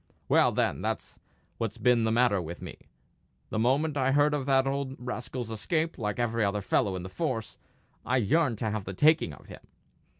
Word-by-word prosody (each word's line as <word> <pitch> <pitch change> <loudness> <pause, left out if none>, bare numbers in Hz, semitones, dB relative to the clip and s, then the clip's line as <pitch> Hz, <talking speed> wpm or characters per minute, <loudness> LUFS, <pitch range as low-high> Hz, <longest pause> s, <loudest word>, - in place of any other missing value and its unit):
Well, - - +4
then, - - 0
that's - - -4 0.4
what's 115 -3 -3
been 120 -2 +3
the 110 - +1
matter 115 -4 +3
with 85 +1 -7
me. - - -8 0.8
The - - -1
moment 140 +6 +1
I 135 0 +2
heard 145 +1 +4
of 140 -2 -2
that 135 -1 +4
old 135 -1 -2
rascal's 125 -1 -5
escape, 160 +8 -1
like 105 -2 -2
every 115 -2 0
other 100 0 0
fellow 95 0 +1
in 90 - -5
the - - -6
force, 115 - -3 0.4
I 130 - +1
yearned 130 +1 +2
to 110 0 -2
have 110 -2 -3
the 95 - -6
taking 155 - +4
of 75 - -13
him. - - -11
125 Hz, 195 wpm, -28 LUFS, 110-140 Hz, 0.8 s, Well